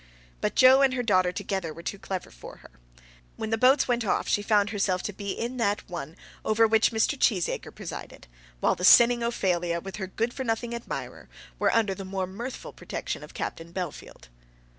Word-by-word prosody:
But - - -1
Joe 260 +1 +7
and 265 -2 +3
her 245 - -1
daughter 185 -5 +3
together 180 -2 -3
were 170 +2 -10
too 200 - -4
clever 190 -1 -5
for - - -11
her. - - -15 0.6
When 220 - -5
the - - +3
boats 260 +4 +5
went 240 -1 +1
off 200 - 0
she 205 - +2
found 205 -1 +2
herself 195 -3 0
to 205 - -4
be 200 +1 -6
in 240 +2 -4
that 205 -3 0
one 165 -3 -6 0.3
over 220 +1 +3
which 220 0 +4
Mr. 220 +5 +1
Cheesacre 205 -10 0
presided, - - -8 0.4
while - - +3
the 180 - -7
sinning 235 +4 +7
Ophelia 175 -7 0
with 195 +3 -8
her 190 -2 -4
good 230 +5 -2
for 265 - -4
nothing 230 0 -2
admirer 235 0 -6 0.3
were - - +3
under 220 -4 +2
the 195 - -7
more 190 0 -3
mirthful 230 +8 -7
protection - - -5
of - - -13
Captain 165 +1 -5
Bellfield. 170 - -7
205 Hz, 195 wpm, -27 LUFS, 185-235 Hz, 0.6 s, Joe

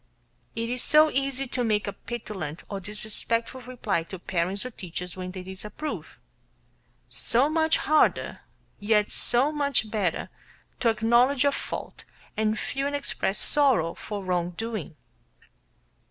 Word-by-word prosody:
It 230 0 -2
is 250 0 -1
so 305 0 +6
easy 275 0 0
to 245 -1 -2
make 215 -2 +1
a 200 - -3
petulant 190 -9 -6
or 200 - -3
disrespectful 220 +4 -2
reply 235 -8 -1
to 190 - -7
parents 185 +4 -1
or 255 - -4
teachers 180 -3 -5
when 185 -1 -5
they 185 0 -7
reprove; 210 +11 -6 0.9
so 245 +4 +3
much 320 0 +3
harder, 310 0 +2 0.4
yet 210 0 +2
so 255 +5 +2
much 280 -7 +1
better, 200 -6 -1 0.5
to 235 - +3
acknowledge 235 +5 +4
a 285 - +5
fault - - -5 0.3
and 215 0 +1
feel 275 +5 -2
and 285 - -2
express 210 -7 0
sorrow 260 - +4
for 205 -2 -6
wrong 175 -1 -1
doing. 220 -8 -4
220 Hz, 140 wpm, -27 LUFS, 190-260 Hz, 0.9 s, so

